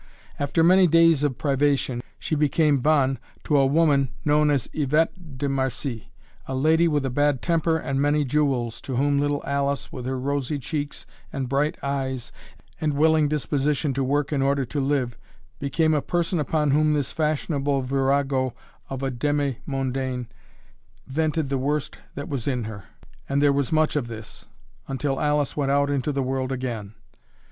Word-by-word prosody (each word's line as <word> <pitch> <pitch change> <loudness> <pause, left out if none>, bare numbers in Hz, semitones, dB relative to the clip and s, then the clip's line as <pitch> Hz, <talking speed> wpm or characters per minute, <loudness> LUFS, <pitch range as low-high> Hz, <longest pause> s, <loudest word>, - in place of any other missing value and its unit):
After 145 +3 +1
many 185 +2 +6
days 165 -2 +5
of 145 -4 0
privation, 140 -3 +1 0.2
she - - -4
became 150 -1 +3
bonne 135 -1 +2 0.2
to 150 - +1
a 135 -1 +5
woman 140 -2 +3 0.2
known 150 0 +4
as 140 -5 +1
Yvette 155 +1 0
de 140 - -1
Marcie, 130 -3 -3 0.4
a 130 - -3
lady 160 +5 +3
with 145 -4 +1
a 135 - -1
bad 145 0 +1
temper 165 -1 +2
and 135 -3 -2
many 145 +1 +2
jewels, 130 -4 0
to 130 - -5
whom 140 +2 +2
little 145 0 0
Alice, 140 -1 -1
with 125 -1 -6
her 130 0 -2
rosy 140 +2 -1
cheeks 145 +2 -4 0.3
and 135 -2 -3
bright 140 +4 0
eyes 130 -3 -3 0.5
and 150 -2 0
willing 155 0 +4
disposition 145 0 0
to 135 +1 -1
work 145 +2 0
in 140 - +1
order 140 0 +1
to 145 +4 -3
live, 135 -4 0 0.4
became 150 +3 +1
a 150 - +2
person 175 +3 -1
upon 150 -1 +1
whom 150 +1 +3
this 145 -3 -1
fashionable 145 -3 0
virago 135 -1 +1 0.3
of 135 0 -5
a 135 - 0
demi 140 0 -1
mondaine 130 -2 -2 0.8
vented 155 +1 -1
the 135 -1 0
worst 145 +2 -2 0.2
that 145 - -5
was 135 -5 -4
in 125 -4 0
her 105 -3 -7 0.4
and 140 - +1
there 145 -1 +4
was 140 -2 0
much 155 -1 +2
of 140 -5 0
this 110 -2 -10 0.4
until 135 +1 -2
Alice 150 -2 +1
went 140 -2 0
out 140 +1 +2
into 140 +1 0
the 140 -1 -1
world 130 0 -2
again. 120 -5 -4
140 Hz, 170 wpm, -24 LUFS, 135-150 Hz, 0.8 s, many